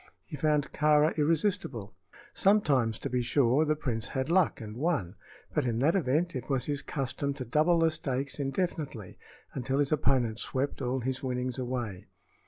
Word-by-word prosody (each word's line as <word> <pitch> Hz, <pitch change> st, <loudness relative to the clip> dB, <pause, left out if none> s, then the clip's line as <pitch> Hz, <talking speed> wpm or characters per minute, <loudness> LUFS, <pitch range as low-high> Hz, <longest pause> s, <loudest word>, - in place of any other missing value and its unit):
He -, -, -7 dB
found 150 Hz, 0 st, +1 dB
Kāra 150 Hz, +1 st, +3 dB
irresistible. 150 Hz, -, 0 dB, 0.4 s
Sometimes, 140 Hz, -, +3 dB
to -, -, -4 dB
be 125 Hz, 0 st, 0 dB
sure, 130 Hz, +4 st, +3 dB
the 155 Hz, 0 st, +1 dB
prince 120 Hz, -6 st, -2 dB
had 130 Hz, +4 st, -2 dB
luck 185 Hz, -1 st, +3 dB
and 110 Hz, -1 st, -7 dB
won, 130 Hz, -, -1 dB, 0.4 s
but 150 Hz, -, +1 dB
in 120 Hz, -3 st, -1 dB
that 145 Hz, +7 st, +3 dB
event 170 Hz, -1 st, +1 dB
it 130 Hz, +1 st, -5 dB
was 135 Hz, -3 st, 0 dB
his 145 Hz, -1 st, -2 dB
custom 140 Hz, 0 st, -3 dB
to 130 Hz, -3 st, -5 dB
double 155 Hz, +8 st, +3 dB
the 165 Hz, -1 st, +3 dB
stakes 135 Hz, -2 st, -3 dB
indefinitely 135 Hz, -, -3 dB, 0.3 s
until 135 Hz, 0 st, -1 dB
his 145 Hz, -1 st, +1 dB
opponent 130 Hz, -7 st, +2 dB
swept 135 Hz, +2 st, -2 dB
all 130 Hz, 0 st, -1 dB
his 130 Hz, +2 st, -2 dB
winnings 125 Hz, -1 st, -2 dB
away. 120 Hz, -7 st, -4 dB
135 Hz, 170 wpm, -29 LUFS, 125-155 Hz, 0.4 s, Kāra